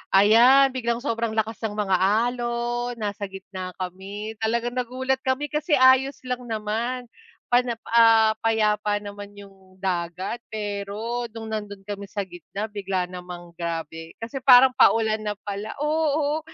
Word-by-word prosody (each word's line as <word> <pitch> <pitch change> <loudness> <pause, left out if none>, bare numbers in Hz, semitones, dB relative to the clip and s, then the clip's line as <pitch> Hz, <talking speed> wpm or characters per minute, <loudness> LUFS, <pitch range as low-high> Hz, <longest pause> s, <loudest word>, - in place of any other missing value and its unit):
ayan, 240 +7 +6
biglang 235 -2 -2
sobrang 230 -4 -1
lakas 220 -1 -1
ng 210 - -8
mga 195 -3 +1 0.3
alon, 240 0 -2
nasa 205 -2 -4
gitna 190 -1 -8
kami. 195 +4 -6
Talagang 235 +2 0
nagulat 255 +2 -1
kami 265 +2 -2
kasi 300 +1 +1
ayos 260 +1 +5
lang 250 -1 -4
naman 225 +3 -2 0.5
pana, 245 -1 +3 0.2
ah, 225 -1 +6
payapa 210 -2 +1
naman 205 0 -8
yung 195 -2 -15
dagat 180 +4 -2
pero 215 +3 -4
no'ng 225 0 -8
nando'n 210 -3 -5
kami 200 0 -6
sa 200 0 -3
gitna 185 +3 -6
bigla 195 -3 -2
namang 180 -1 -9
grabe. 165 -1 -5
Kasi 230 +4 -6
parang 260 0 +8
paulan 220 -2 +4
na 210 -1 -3
pala, 205 +1 -5
oo, 300 -1 +1
220 Hz, 140 wpm, -24 LUFS, 200-245 Hz, 0.5 s, parang